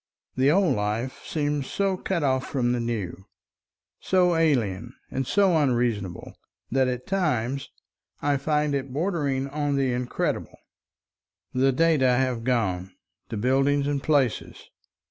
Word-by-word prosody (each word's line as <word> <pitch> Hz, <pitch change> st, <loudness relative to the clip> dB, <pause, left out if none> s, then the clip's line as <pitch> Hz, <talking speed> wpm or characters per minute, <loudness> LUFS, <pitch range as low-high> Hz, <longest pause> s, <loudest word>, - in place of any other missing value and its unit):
The 130 Hz, +2 st, +3 dB
old 185 Hz, +3 st, +3 dB
life 105 Hz, +5 st, -3 dB
seems 145 Hz, -3 st, -1 dB
so 195 Hz, -1 st, 0 dB
cut 180 Hz, -3 st, -2 dB
off 130 Hz, -2 st, +1 dB
from 125 Hz, -3 st, 0 dB
the 125 Hz, -, 0 dB
new, 105 Hz, -6 st, -4 dB, 0.7 s
so 180 Hz, -2 st, +2 dB
alien 120 Hz, -8 st, 0 dB, 0.2 s
and 135 Hz, -1 st, -2 dB
so 195 Hz, -4 st, +3 dB
unreasonable, 120 Hz, -, 0 dB, 0.4 s
that 130 Hz, +1 st, +3 dB
at 125 Hz, 0 st, -3 dB
times 140 Hz, -8 st, -1 dB, 0.5 s
I 145 Hz, 0 st, +1 dB
find 150 Hz, +1 st, 0 dB
it 135 Hz, -1 st, -2 dB
bordering 145 Hz, -4 st, -1 dB
upon 145 Hz, 0 st, -1 dB
the 135 Hz, -2 st, +1 dB
incredible. 125 Hz, 0 st, -2 dB, 1.0 s
The 135 Hz, +1 st, +3 dB
data 155 Hz, -1 st, +3 dB
have 125 Hz, -2 st, 0 dB
gone, 95 Hz, -7 st, -1 dB, 0.3 s
the 115 Hz, -, -4 dB
buildings 135 Hz, +5 st, +2 dB
and 145 Hz, -1 st, -1 dB
places. 140 Hz, -6 st, 0 dB
135 Hz, 130 wpm, -25 LUFS, 120-150 Hz, 1.0 s, The